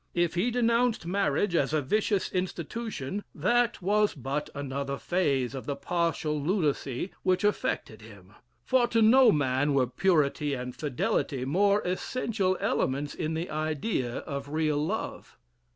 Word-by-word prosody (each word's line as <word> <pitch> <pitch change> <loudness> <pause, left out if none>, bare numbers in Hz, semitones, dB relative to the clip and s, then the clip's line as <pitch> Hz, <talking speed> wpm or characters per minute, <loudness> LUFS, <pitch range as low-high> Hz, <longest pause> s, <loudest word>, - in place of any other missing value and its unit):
"If 175 -1 +1
he 180 +8 +1
denounced 235 -3 +1
marriage 185 0 +1
as 150 -3 +1
a 155 - +2
vicious 205 +6 0
institution, 185 - -4
that 235 +6 +1
was 210 +2 +2
but 140 +2 -3
another 140 0 -3
phase 140 -9 0
of 135 - -7
the 140 - -1
partial 155 0 -1
lunacy 150 - -1
which 185 +1 +1
affected 160 - -1
him: 100 -3 -15 0.3
for 255 -2 +3
to 230 -2 +2
no 255 +4 +7
man 145 0 +1
were 130 -2 +4
purity 145 0 +1
and 125 0 -6
fidelity 130 -1 -1
more 200 +8 +3
essential 185 0 -1
elements 140 +2 -1
in 160 0 -3
the 165 +1 -3
idea 155 - -2
of 140 -1 -6
real 155 -1 0
love. 205 +8 -4
155 Hz, 140 wpm, -28 LUFS, 140-200 Hz, 0.3 s, no